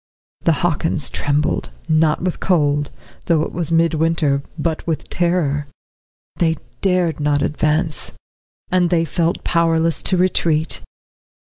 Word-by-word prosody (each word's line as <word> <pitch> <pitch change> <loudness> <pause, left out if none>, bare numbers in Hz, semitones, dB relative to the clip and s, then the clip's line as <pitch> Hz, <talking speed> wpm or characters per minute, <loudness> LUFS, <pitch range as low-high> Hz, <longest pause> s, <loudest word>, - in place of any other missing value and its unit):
The 165 - +5
Hockins 160 -2 +1
trembled, 145 - -1 0.2
not 155 0 +2
with 180 -1 -2
cold, 145 -5 +1 0.4
though 160 -3 +2
it - - -4
was 170 -1 -1
mid 165 0 +3
winter, 155 -3 +1 0.2
but 160 +1 -2
with 160 -2 -3
terror. 160 -5 0 0.7
They 165 -2 +1 0.2
dared 180 -4 +1
not 145 -1 +1
advance, 155 0 0 0.6
and 180 -1 +3
they 165 -1 +2
felt 165 +2 -1
powerless 165 -1 +1
to 185 - +1
retreat. 170 -3 +1
165 Hz, 125 wpm, -19 LUFS, 150-170 Hz, 0.7 s, The